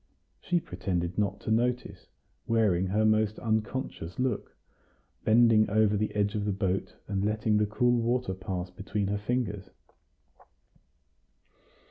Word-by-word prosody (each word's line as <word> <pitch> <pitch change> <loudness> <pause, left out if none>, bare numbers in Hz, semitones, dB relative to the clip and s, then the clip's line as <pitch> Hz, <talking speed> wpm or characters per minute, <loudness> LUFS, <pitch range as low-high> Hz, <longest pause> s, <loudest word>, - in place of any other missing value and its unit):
She 175 -1 0
pretended 90 - -3
not 100 -1 0
to - - -3
notice, 120 +2 -1 0.4
wearing 100 -5 +2
her 105 +3 +1
most 110 -1 +2
unconscious 110 -5 -3
look, 125 -5 -2 0.7
bending 110 -1 +5
over 105 0 +3
the 105 +1 -1
edge 100 0 +1
of 105 -1 -2
the 105 - +1
boat, 95 -1 -2
and 100 -1 -1
letting 105 0 +1
the 105 0 +2
cool 120 +3 +2
water 120 -3 0
pass 90 -1 -5
between 100 +2 -3
her 100 0 -1
fingers. 105 -4 -2
105 Hz, 130 wpm, -29 LUFS, 95-115 Hz, 0.7 s, bending